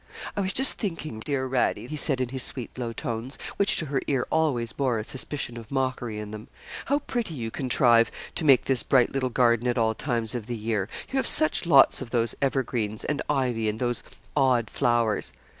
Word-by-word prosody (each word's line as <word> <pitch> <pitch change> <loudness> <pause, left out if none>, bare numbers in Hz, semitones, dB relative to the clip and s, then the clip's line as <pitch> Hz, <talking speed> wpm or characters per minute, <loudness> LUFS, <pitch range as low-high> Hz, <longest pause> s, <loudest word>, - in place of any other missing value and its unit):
'I 205 - 0
was 190 0 -1
just 265 0 +3
thinking, 165 - -4
dear 130 +2 -2
Radie,' 125 -3 0
he 155 - -5
said 140 -3 +1
in 125 - -1
his 130 0 -2
sweet 125 -1 -1
low 120 -2 -3
tones, 115 0 -5 0.2
which 200 - +3
to 160 - 0
her 140 -2 -1
ear 135 -3 +1
always 125 -8 +1
bore 130 -4 0
a 110 - -3
suspicion 130 0 -4
of 115 -2 -10
mockery 130 -4 -2
in 105 0 -6
them, 110 +1 -8 0.4
'how 280 - +2
pretty 240 - -3
you 115 -4 -4
contrive 120 -3 +3 0.2
to - - -1
make 135 -5 +5
this 130 -4 +3
bright 125 0 +3
little 130 -1 -1
garden 120 -1 +2
at 120 +1 0
all 110 -1 +2
times 115 -3 -2
of 120 -3 -5
the 120 -1 -3
year 110 -2 -2 0.2
you 270 - -1
have 265 - +1
such 310 - +2
lots 140 -4 +6
of 130 - -6
those 115 -1 0
evergreens, 120 -6 -1
and 150 - -1
ivy, 125 -6 +1
and 105 - -3
those 120 -2 -1 0.3
odd 125 -4 +2
flowers.' 115 -3 +1
125 Hz, 210 wpm, -26 LUFS, 115-140 Hz, 0.4 s, lots